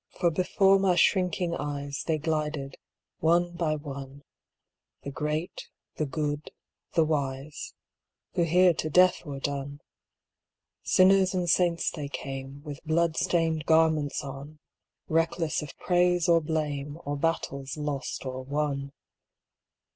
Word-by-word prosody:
For 170 - +3
before 195 +3 +3
my 190 -2 +3
shrinking 180 -2 +2
eyes 145 -1 -4
They 160 -1 +2
glided, 150 -3 -2 0.4
one 175 +2 +3
by 170 -3 -1
one, 140 -1 -8 0.8
The 140 - -5
great, 150 +5 -3 0.3
the 155 - -1
good, 145 +2 -3 0.5
the 165 - +4
wise, 140 -1 -3 0.6
Who - - +1
here 175 +2 +5
to 155 - -3
death 180 +3 +4
were 140 -1 -5
done; 140 0 -4 1.0
Sinners 190 0 +4
and 180 -1 0
saints 170 0 +2
they 150 -3 -5
came 135 0 -6
With 145 -2 -8
blood 160 +1 +1
stained 165 -3 0
garments 160 -3 +3
on, 140 +2 -8 0.5
Reckless 165 0 0
of 150 - -9
praise 180 -1 +2
or 170 -1 +5
blame. 150 -2 -2
Or 145 +1 -2
battles 140 -3 -2
lost 145 -2 -4
or 130 0 -4
won. 140 0 -2
155 Hz, 125 wpm, -28 LUFS, 140-170 Hz, 1.0 s, here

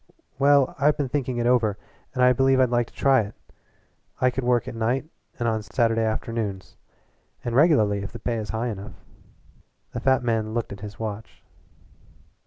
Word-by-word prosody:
"Well, 140 -1 +4
I've 145 +2 +3
been 140 -3 -1
thinking 130 -3 -2
it 120 - 0
over, 115 -5 +2 0.4
and 125 - +2
I 125 0 +6
believe 135 +1 +3
I'd 130 -2 +3
like 120 -1 +1
to - - -20
try 135 -3 +4
it. 105 0 -7 0.8
I 130 - +3
could 130 +1 -3
work 120 -1 +1
at - - -5
night 120 +5 -1 0.3
and 120 - -1
on 110 -1 0
Saturday 115 +1 +1
afternoons 110 -3 -3 0.7
and 120 -1 -2
regularly 125 -9 +4
if 100 - -6
the 120 - -8
pay 115 0 -2
is 110 -2 -5
high 115 +2 -2
enough." 105 -1 -7 1.0
The - - -3
fat 130 +1 +2
men 110 -2 -1
looked 120 -3 -2
at 100 - -10
his 105 0 -8
watch. 110 -1 -7
120 Hz, 185 wpm, -24 LUFS, 110-130 Hz, 1.0 s, I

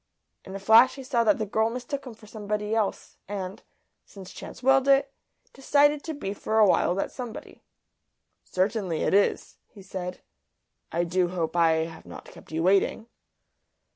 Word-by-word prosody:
In 190 - -9
a - - -5
flash 225 +6 +6
he 270 - -9
saw 250 -3 +1
that 210 - +4
the 220 - -2
girl 220 +2 +1
mistook 255 +3 -5
him 235 - -9
for 215 - -17
somebody 210 0 -4
else, 220 -3 -2
and 195 -1 -6 0.4
since 190 -2 -12
chance - - -10
willed 270 +1 +4
it 275 0 +3 0.4
decided 290 +2 +2
to 320 -2 -4
be 200 -8 -4
for 220 +2 -2
a 215 - +7
while 180 -2 +2
that 195 - -2
somebody. 245 -4 -9 0.8
"Certainly, 185 -3 -1
it - - 0
is," 200 +1 +1
he 200 - -15
said. 180 -1 -6 0.7
"I 170 +1 0
do 175 +1 +1
hope 175 -2 -3
I 160 -1 +3
have 160 -1 -11
not - - -10
kept - - -15
you 160 +1 -2
waiting." 195 +4 +2
210 Hz, 170 wpm, -26 LUFS, 185-245 Hz, 0.8 s, a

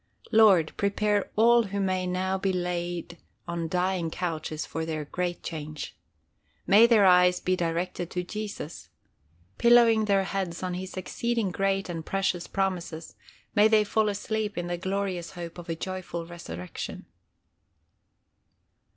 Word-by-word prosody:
Lord, 200 -8 +5
prepare 205 0 +1
all 235 +2 +6
who 200 0 -3
may 185 -1 0
now 185 +1 -1
be 195 0 +1
laid 175 -1 -3 0.3
on 170 -1 -2
dying 180 -1 0
couches 160 -3 -3
for 160 - -4
their 155 -2 -3
great 175 +3 -3
change. 155 -2 -6 0.7
May 210 +5 +7
their 220 -4 +5
eyes 180 -1 +5
be 185 - +1
directed 175 0 -2
to 180 - -3
Jesus. 205 -4 -6 0.7
Pillowing 235 -2 +6
their 200 -2 +3
heads 190 -3 -3
on 180 -1 -2
his 185 +1 -6
exceeding 230 +2 -1
great 195 +1 0
and 165 -2 -5
precious 190 -1 -1
promises, 180 -4 -3 0.4
may 210 +1 +6
they 220 -1 +4
fall 215 +1 +1
asleep 210 0 -3
in 175 - -2
the 175 0 -2
glorious 190 -1 -3
hope 170 -1 -7
of 170 0 -10
a 165 - -1
joyful 180 -1 -5
resurrection. 90 - -7
185 Hz, 140 wpm, -27 LUFS, 170-200 Hz, 0.7 s, May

